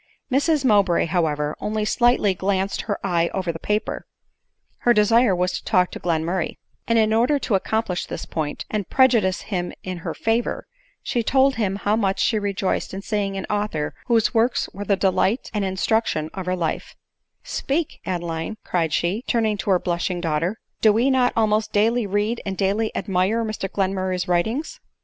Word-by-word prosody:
Mrs 285 +1 +2
Mowbray, 200 -7 +4
however, 155 -3 0
only 215 0 -2
slightly 240 -3 +3
glanced 190 +1 -1
her 205 -3 -3
eye 170 -3 +1
over 185 -3 -1
the 165 - -8
paper; 210 +4 -2 0.7
her 240 -1 +3
desire 210 0 +4
was 180 +1 0
to - - -4
talk 180 -4 +2
to - - -7
Glenmurray; 170 +1 -1 0.3
and 230 - +3
in 220 -1 +3
order 245 +6 +3
to 260 - -2
accomplish 195 -1 0
this - - -5
point, 150 -2 -4
and 210 -4 -2
prejudice 230 -8 +3
him 180 -4 -3
in 185 -1 -5
her - - -5
favor, 225 +1 -1 0.4
she 240 - 0
told 265 +4 +3
him 205 -5 -1
how 205 +1 0
much 195 -3 0
she 220 - +2
rejoiced 200 -2 -2
in 195 - -6
seeing 200 -3 -1
an 190 - -4
author 205 -8 -2
whose 230 -2 +3
works 235 +2 +2
were 205 +1 -6
the 200 - +3
delight 190 +4 +1
and 210 -2 0
in 190 -1 -2
struction 185 -8 0
of 190 -2 -6
her 185 - +1
life, 165 -3 -3 0.3
" - - -53 0.2
Speak, 295 +3 -2
Adeline," 175 +2 -3
cried 165 -3 0
she; 185 +9 0
turning 220 -3 +1
to 200 - -4
her 190 - +5
blushing 175 0 -2
daughter; 165 +4 -1
" - - -49
do 215 - +6
we 235 +6 +2
not 255 -2 +3
almost 215 -1 +1
daily 225 +2 +2
read 205 +4 0
and 195 -2 -4
daily 205 +3 +1
admire 195 +4 0
Mr 215 -3 -4
Glenmurray 190 -1 -1
's 180 - -2
writings?" 220 - -1
200 Hz, 185 wpm, -23 LUFS, 180-225 Hz, 0.7 s, do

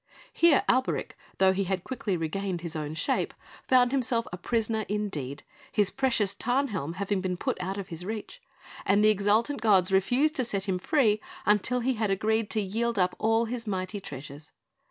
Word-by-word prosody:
Here 335 -4 +5
Alberic, 260 +1 +1 0.3
though 190 0 +4
he 195 +1 -1
had 185 -1 -2
quickly 220 -7 -2
regained 175 +2 -3
his 170 -2 -5
own 155 0 -4
shape, - - -1 0.3
found 250 -1 +5
himself 250 -3 +1
a - - -3
prisoner 220 +3 -1
indeed, 155 -10 -3 0.3
his 205 -3 +2
precious 235 -7 +1
Tarnhelm 215 - -1
having 200 0 -1
been 180 -1 -2
put - - -1
out 190 +2 -3
of 195 -1 -6
his 165 0 -6
reach; 220 - -6 0.4
and 200 +1 +3
the 215 - +6
exultant 215 +7 +2
gods 195 -4 +4
refused 250 - +2
to 260 - +2
set 200 -4 -2
him 185 -2 0
free 215 - +2 0.2
until 210 +4 +2
he 260 +2 +1
had 215 -3 -1
agreed 215 +2 +1
to 215 - 0
yield 225 +4 -1
up 180 -1 +2
all 225 +1 +2
his 230 0 -5
mighty 190 +1 -3
treasures. 145 -2 -9
205 Hz, 180 wpm, -28 LUFS, 185-230 Hz, 0.4 s, the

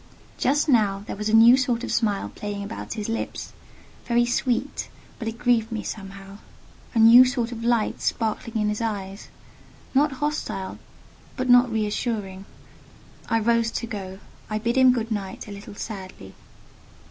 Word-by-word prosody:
Just 290 +4 +2
now 205 -7 +2
there - - -5
was 210 +1 -3
a - - 0
new 230 +2 +8
sort 250 -3 0
of - - -4
smile 210 -3 0
playing 205 -1 -5
about 205 +3 -6
his 210 -2 -4
lips—very 235 +1 -3
sweet, 245 +3 -1 0.3
but 225 - -5
it 225 0 -4
grieved 235 -2 +1
me 220 -1 -3
somehow—a 195 +3 -10
new 230 +3 +9
sort 250 -2 -1
of 230 -1 -6
light 235 -2 +1
sparkling 225 0 -2
in 210 0 +1
his 210 +2 -2
eyes: 200 -3 -4 0.7
not 285 +1 +3
hostile, 280 -9 -3 0.6
but 255 -1 -2
not 245 0 +6
reassuring. 210 -3 -2 0.8
I 225 0 +2
rose 230 +1 +2
to - - -2
go—I 205 0 -7
bid 235 +3 -1
him 260 -1 +6
good 235 -2 -2
night 195 -2 -4
a - - -8
little 200 0 -10
sadly. 190 - -8
225 Hz, 150 wpm, -24 LUFS, 205-240 Hz, 0.8 s, new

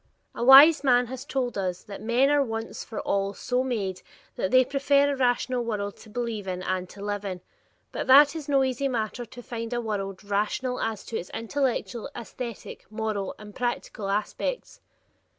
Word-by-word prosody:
A - - -4
wise 285 +5 +9
man 250 -2 +4
has 260 0 -7
told 250 -5 -2
us 180 -2 -3
that 200 -1 -9
"men 240 +5 +3
are 290 -1 +4
once 225 -2 -5
for 225 - -6
all 200 0 -1
so 250 0 -1
made 200 -8 -2 0.3
that 190 - -1
they 255 +2 +5
prefer 280 +1 +2
a - - -1
rational 250 -1 +1
world 205 -3 -3
to 220 - -15
believe 225 -3 -4
in 185 0 -3
and 185 -1 -2
to 200 0 -9
live 205 0 -2
in," 185 -3 -4 0.5
but - - -4
that 280 +2 +8
it 325 - -4
is 295 -1 -10
no 275 -1 +4
easy 260 +1 0
matter 240 -1 -2
to 245 +2 -12
find 230 -1 -5
a 240 - 0
world 200 -4 -4
rational 210 +5 -1
as 220 -3 -3
to 225 - -4
its 180 - -8
intellectual, 245 0 -2
aesthetic, 235 -2 -8
moral, 215 -3 -3
and 210 -1 -11
practical 240 -4 -3
aspects. 215 - -3
235 Hz, 185 wpm, -26 LUFS, 205-260 Hz, 0.5 s, wise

